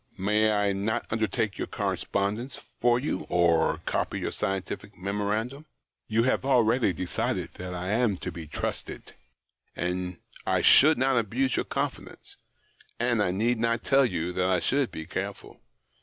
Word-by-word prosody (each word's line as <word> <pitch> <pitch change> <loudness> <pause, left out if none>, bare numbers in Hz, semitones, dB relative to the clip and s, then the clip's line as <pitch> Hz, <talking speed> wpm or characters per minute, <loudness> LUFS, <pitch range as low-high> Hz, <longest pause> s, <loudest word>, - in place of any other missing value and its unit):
May 105 +3 +2
I 105 -1 +2
not 110 +4 -1
undertake 110 -2 -1
your - - -2
correspondence 105 +7 -2 0.2
for 120 0 +4
you, 125 -8 -3
or 85 -2 +3
copy - - -1
your - - -2
scientific 95 +1 -4
memoranda? 105 +8 -2 0.4
You 115 +1 +2
have 130 - +1
already 125 -4 +3
decided 90 +1 -2
that 90 0 -5
I 90 +1 -4
am 110 -3 +2
to - - -2
be 80 -2 -8
trusted 75 - -5 0.3
— - - -47
that 90 0 -2 0.3
I - - +1
should 155 +3 +7
not 130 0 +3
abuse 125 +4 0
your - - 0
confidence - - -5 0.3
— - - -31
and 120 -2 +2
I 100 - +2
need 110 +6 +1
not 115 0 0
tell 135 0 +4
you 90 -3 -2
that 90 +1 +1
I 90 -2 +3
should 135 +8 +1
be 80 - -7
careful. - - -6
105 Hz, 160 wpm, -27 LUFS, 90-120 Hz, 0.4 s, should